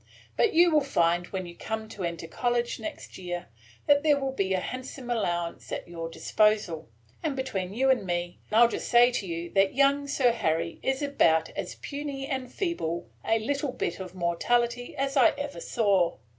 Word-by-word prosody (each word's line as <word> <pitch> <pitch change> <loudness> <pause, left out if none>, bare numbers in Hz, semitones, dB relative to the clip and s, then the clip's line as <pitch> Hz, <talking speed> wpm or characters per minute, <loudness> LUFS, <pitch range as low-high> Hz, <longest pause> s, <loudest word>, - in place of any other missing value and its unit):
But 435 - +2
you 345 +1 +6
will 305 -1 +4
find, 175 -8 +1
when 190 -1 -4
you 170 0 -10
come 220 +2 -4
to 205 -4 -7
enter 170 -1 -3
college 240 +6 -1
next 315 -10 -7
year, 175 -4 -5 0.4
that 285 0 +5
there 295 -2 +3
will 270 -1 -1
be 195 -7 0
a - - +1
handsome 255 +3 -6
allowance 175 -7 -2
at - - -4
your 165 -1 -6
disposal; 190 -4 +1 0.3
and, 305 -4 -1
between 205 -9 -3
you 265 +2 +4
and 255 - +1
me, 175 -1 -3
I 225 +2 +7
'll - - +7
just - - -4
say 240 0 +6
to 210 -5 -3
you 170 0 -4
that 195 +1 +3
young 280 +1 +3
Sir 265 -3 +3
Harry 165 -6 -1
is 265 +2 -1
about 165 - +3
as - - -5
puny 280 -1 -5
and 260 -2 -4
feeble 170 - -3
a 225 - +2
little 275 +4 -2
bit 170 - -3
of 185 -1 -7
mortality 235 +8 0
as 275 +1 -1
I 265 - +5
ever 285 0 -5
saw. 200 -7 +2
230 Hz, 190 wpm, -28 LUFS, 175-270 Hz, 0.4 s, I